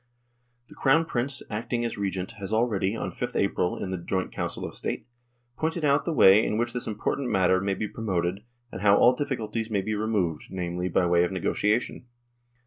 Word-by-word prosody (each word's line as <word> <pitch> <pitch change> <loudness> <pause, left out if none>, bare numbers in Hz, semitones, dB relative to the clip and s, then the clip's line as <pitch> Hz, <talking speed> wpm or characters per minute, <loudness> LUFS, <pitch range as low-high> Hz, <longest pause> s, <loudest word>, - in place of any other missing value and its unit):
" 120 0 -45
The - - -13
Crown 150 +5 +3
Prince, 135 -2 -2
acting 120 +2 -2
as 115 - -3
Regent, 95 -2 -3
has 100 0 -5
already, 110 -3 +1
on - - -3
5th 125 0 -5
April 90 -2 0
in 95 - -4
the 95 - -3
joint 95 +2 -2
Council - - -4
of - - -6
State, - - -4 0.5
pointed 160 +3 -1
out 140 0 +3
the 170 - 0
way 105 -8 +7
in 105 - -1
which 120 +1 -1
this 125 - -3
important 120 +5 -2
matter 95 -2 +3
may 100 -1 0
be 105 - -3
pro 115 - -8
moted, 90 -2 0 0.3
and 95 - -7
how 100 -1 +5
all 125 - +6
difficulties 115 -5 -3
may 100 -3 0
be 110 +3 -3
removed, 105 -7 -1
namely, 90 0 -3
by 90 +1 +2
way 85 0 +4
of 90 - -1
negotiation. 105 +6 -1
105 Hz, 205 wpm, -26 LUFS, 95-120 Hz, 0.5 s, way